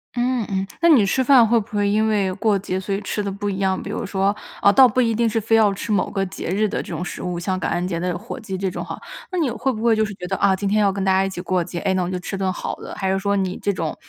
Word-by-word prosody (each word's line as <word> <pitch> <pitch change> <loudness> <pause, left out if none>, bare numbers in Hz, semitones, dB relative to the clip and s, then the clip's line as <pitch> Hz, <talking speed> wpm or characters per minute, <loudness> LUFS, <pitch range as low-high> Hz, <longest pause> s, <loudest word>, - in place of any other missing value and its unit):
嗯 245 -1 0
嗯， 190 0 -1 0.2
那 340 - +5
你 260 -11 +6
吃 260 +7 +1
饭 250 -4 +6
会 235 +1 +4
不 210 0 -8
会 205 0 +2
因 215 +2 +2
为 205 -3 +1
过 215 -3 +2
节 190 -1 -3
所 190 +1 -3
以 - - -2
吃 210 - -3
得 200 - -3
不 205 +1 -3
一 195 0 -3
样？ 190 -1 +1
比 - - -7
如 215 - -3
说 195 +1 0 0.4
倒 260 -1 +9
不 250 +3 -1
一 230 -2 +2
定 230 +1 +1
是 225 - 0
非 225 +1 +2
要 215 -2 +5
吃 205 +3 -5
某 200 -3 +1
个 195 -1 -1
节 180 -2 -6
日 210 +4 +1
的 - - -2
这 - - -9
种 165 +2 -3
食 - - -6
物， 180 -1 -3
像 185 +2 -2
感 - - -2
恩 175 +1 -1
节 170 -2 -2
的 180 0 -2
火 230 +7 -7
鸡 205 -5 -5
这 190 -1 -2
种 - - -5
哈， - - -7 0.3
那 370 - -2
你 305 -7 +1
会 260 +3 -1
不 220 -1 -5
会 230 -2 +4
就 220 - +2
是 210 - -6
觉 180 - -7
得， - - -1
啊， 195 -1 +3
今 200 +1 -3
天 210 +2 +2
要 200 -1 +3
跟 195 0 -3
大 190 - +2
家 190 0 +3
一 - - -2
起 190 - -7
过 180 0 0
节， 170 +1 -5
哎， 190 - 0
那 185 - +1
我 175 - -3
就 185 - -2
吃 180 - -5
顿 190 -1 0
好 - - -4
的。 - - -9
还 190 -1 -1
是 195 - +1
说 200 +1 0
你 190 -2 -1
这 200 - +1
种 165 -3 -3
200 Hz, 360 characters per minute, -21 LUFS, 190-220 Hz, 0.4 s, 倒